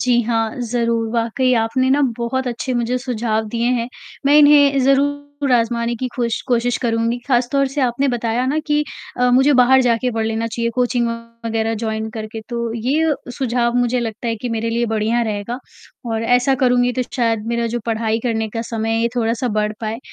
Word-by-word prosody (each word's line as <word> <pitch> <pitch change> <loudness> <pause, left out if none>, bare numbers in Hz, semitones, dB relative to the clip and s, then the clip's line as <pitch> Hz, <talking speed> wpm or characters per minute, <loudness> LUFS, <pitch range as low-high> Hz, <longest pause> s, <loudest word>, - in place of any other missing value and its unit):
जी 245 -1 +3
हाँ, 225 -1 -1
ज़रूर, 230 -1 0
वाक़ई 235 +3 +1
आपने 235 +3 +1
ना 280 +2 +3 0.2
बहुत 260 +2 -2
अच्छे 245 +2 -3
मुझे 240 +1 0
सुझाव 230 -3 -1
दिए 235 +1 -1
हैं, 235 -1 -1 0.4
मैं 290 +1 +6
इन्हें 290 -2 +6
ज़रूर 285 0 +1
आजमाने 235 0 +1
की 255 +2 -3
खुश 235 -2 -1
कोशिश 245 0 +1
करूँगी। 230 0 0
खासतौर 270 +1 +2
से 275 +2 -3
आपने 255 +2 +1
बताया 240 0 -1
ना 290 +4 0
कि 295 -1 +2 0.4
अ, 250 0 +4
मुझे 265 +4 +5
बाहर 260 0 +5
जाके 245 0 +1
पढ़ 225 -1 -2
लेना 225 +1 -1
चाहिए 230 +1 -2
कोचिंग 245 -1 +1 0.4
वगैरह 225 0 -1
जॉइन 220 0 -3
करके, 220 -1 -6
तो 235 -2 -3
ये 290 +7 +1 0.2
सुझाव 240 -2 0
मुझे 245 0 +1
लगता 230 0 -4
है 225 - -1
कि 245 +3 -5
मेरे 230 0 -2
लिए 235 +1 0
बढ़िया 220 +2 0
रहेगा। 220 +2 -3 0.5
और 225 0 -1
ऐसा 250 +3 +3
करूँगी 245 0 +3
तो 255 0 -1
शायद 230 -4 0
मेरा 235 0 0
जो - - -3
पढ़ाई 225 0 0
करने 225 -2 0
का 225 +1 -3
समय 225 -1 -3
है 225 0 +1
ये 235 - +2
थोड़ा-सा 230 +1 0
बढ़ 210 0 -1
पाए, 220 0 -3
235 Hz, 190 wpm, -19 LUFS, 225-255 Hz, 0.5 s, मैं